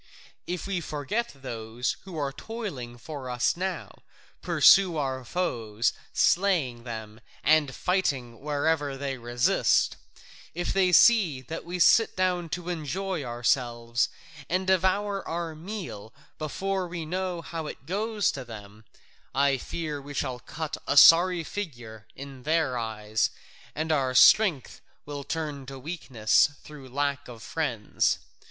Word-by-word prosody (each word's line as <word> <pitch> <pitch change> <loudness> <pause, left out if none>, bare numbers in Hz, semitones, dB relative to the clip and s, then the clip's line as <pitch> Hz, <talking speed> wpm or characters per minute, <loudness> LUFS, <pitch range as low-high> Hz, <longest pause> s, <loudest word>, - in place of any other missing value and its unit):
If 180 -1 -3
we 195 -3 -2
forget 160 +11 -3
those 115 0 -3
who 185 -4 -8
are 140 -2 -2
toiling 145 - -6
for 140 0 -7
us 125 0 +1
now, 190 +2 -4 0.5
pursuing 190 -4 +5
our 130 -3 -2
foes, 115 -8 -1 0.2
slaying 160 -11 +2
them, 110 -1 -7 0.2
and 150 -3 +3
fighting 135 -11 -1
wherever 145 -1 0
they 135 -1 -4
resist, 120 +1 +2 0.6
if 175 0 -2
they 190 -2 +3
see 185 - +6
that 160 +6 -6
we 175 +1 -4
sit 225 +6 +5
down 180 -2 0
to 175 +2 -4
enjoy 175 +1 -3
ourselves 120 -1 0 0.4
and 185 +2 0
devour 190 +2 +1
our 165 -1 -3
meal 155 - -7 0.2
before 190 +5 -2
we 170 -2 -5
know 180 0 -3
how 165 -2 -5
it 135 - -9
goes 210 +3 0
with 130 -3 -7
them, 105 -1 -11 0.5
I 140 -1 +3
fear 155 -2 -4
we 145 +1 -9
shall 125 -2 -2
cut 160 +4 -5
a 145 - +1
sorry 175 +3 +8
figure 120 - -7
in 135 -1 -9
their 155 -2 +1
eyes, 110 -2 -1 0.5
and 160 +1 -1
our 130 -4 +1
strength 175 - +5 0.2
will 145 -1 -6
turn 150 -4 -4
to 135 0 -7
weakness 130 -5 +2
through 145 -4 -11
lack 140 +1 -1
of 115 -3 -10
friends. 125 -10 0
145 Hz, 135 wpm, -27 LUFS, 125-180 Hz, 0.6 s, sorry